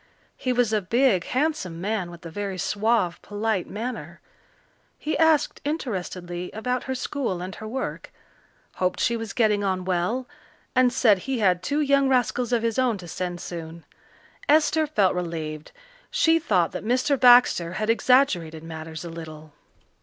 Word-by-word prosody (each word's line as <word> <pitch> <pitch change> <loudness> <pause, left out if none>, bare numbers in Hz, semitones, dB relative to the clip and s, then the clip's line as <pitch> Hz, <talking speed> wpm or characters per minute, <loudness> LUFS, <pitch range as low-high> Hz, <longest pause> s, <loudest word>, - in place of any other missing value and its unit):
He 255 - -2
was 245 -3 +1
a 215 - +2
big, 225 -2 +2
handsome 260 - -1
man 200 -1 -2
with 170 0 -12
a 165 - -7
very 200 0 -4
suave, 210 -2 0
polite 205 -2 -2
manner. 235 +5 -6 0.8
He 310 - -2
asked 320 -2 +2
interestedly 180 - -4
about 250 +3 -2
her 260 - -2
school 255 -7 -2
and 185 +2 -6
her 215 - -8
work, 260 +4 -5 0.7
hoped 185 0 0
she 235 - +2
was 225 -2 -5
getting 210 -3 +2
on 185 -2 -1
well, 190 +8 -1 0.5
and 255 -1 +4
said 220 -5 +4
he 265 +7 -3
had 185 -5 +2
two 290 +9 0
young 280 -1 +3
rascals 250 -1 +1
of 235 -2 +1
his 230 +1 0
own 250 -4 +2
to 180 -2 -10
send 175 +1 -4
soon. 165 -1 -7 0.6
Esther 310 +1 +4
felt 205 -10 +2
relieved. 160 -3 -5 0.4
She 325 0 +3
thought 180 - +1
that - - -6
Mr. 255 +5 +1
Baxter 245 -9 +6
had 215 +3 +1
exaggerated 205 - +2
matters 160 0 -7
a - - -6
little. 155 -2 -10
215 Hz, 160 wpm, -25 LUFS, 175-255 Hz, 0.8 s, Baxter